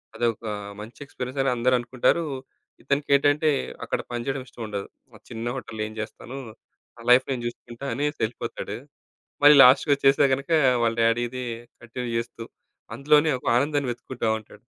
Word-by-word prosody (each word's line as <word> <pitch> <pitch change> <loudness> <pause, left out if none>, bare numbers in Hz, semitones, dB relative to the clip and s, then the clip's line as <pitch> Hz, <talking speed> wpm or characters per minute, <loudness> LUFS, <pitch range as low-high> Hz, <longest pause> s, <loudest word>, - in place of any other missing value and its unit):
అదొక 115 -1 -1 0.4
మంచి 110 +3 -11
ఎక్స్పీరియన్స్ 130 -1 -6
అని 135 - +2
అందరనుకుంటారు. 125 +6 +1 0.6
ఇతనికేంటంటే 145 +2 +2 0.3
అక్కడ - - -2
పని 120 -1 -3
జేయడం 135 -1 -2
ఇష్టం 120 - -9
ఉండదు. 100 -2 -5 0.3
ఆ - - -12
చిన్న 115 -1 -6
హోటల్‌లో 115 -4 -6
ఏం 110 - -10
చేస్తాను 115 +4 -8 0.6
నా - - -12
లైఫ్ 130 +1 +6
నేను 125 -3 -3
జూసుకుంటా 120 +2 -7
అనేసెళ్ళిపోతాడు. 120 -4 -3 0.7
మళ్ళీ 145 +1 +9
లాస్ట్‌‌కొచ్చేస్తే 140 +1 +5
గనుక 140 +4 -3 0.3
వాళ్ళ 115 -1 +1
డ్యాడీది 120 +2 0 0.4
కంటిన్యూ 120 +1 -6
జేస్తూ 115 0 -4 0.5
అందులోనే 150 +2 +4
ఒక - - -16
ఆనందాన్ని 140 0 0
వెతుక్కుంటా 120 0 -5
ఉంటాడు. 110 - -17
125 Hz, 135 wpm, -25 LUFS, 115-140 Hz, 0.7 s, మళ్ళీ